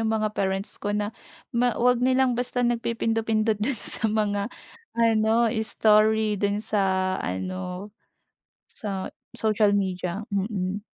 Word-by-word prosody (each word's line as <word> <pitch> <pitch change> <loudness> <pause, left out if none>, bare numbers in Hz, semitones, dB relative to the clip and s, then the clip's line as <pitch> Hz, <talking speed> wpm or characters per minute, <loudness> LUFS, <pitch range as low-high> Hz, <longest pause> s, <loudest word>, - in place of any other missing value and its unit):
'yung 225 - 0
mga 215 -1 0
parents 195 0 -2
ko - - -3
na, 210 +1 -2 0.4
ma 240 0 +1
huwag 250 0 +3
nilang 260 0 +3
basta 245 0 -1
nagpipindot-pindot 225 -2 0
do'n 240 +3 0
sa 220 +1 +1
mga 210 -1 0 0.5
ano, 225 0 +3
story 215 -1 +3
do'n 205 0 +1
sa 210 -2 0 0.4
ano, 185 - -4 0.8
sa 195 -3 -5 0.2
social 215 -2 +2
media. 185 0 -2
Mm. 200 0 -2
215 Hz, 120 wpm, -25 LUFS, 200-225 Hz, 0.8 s, huwag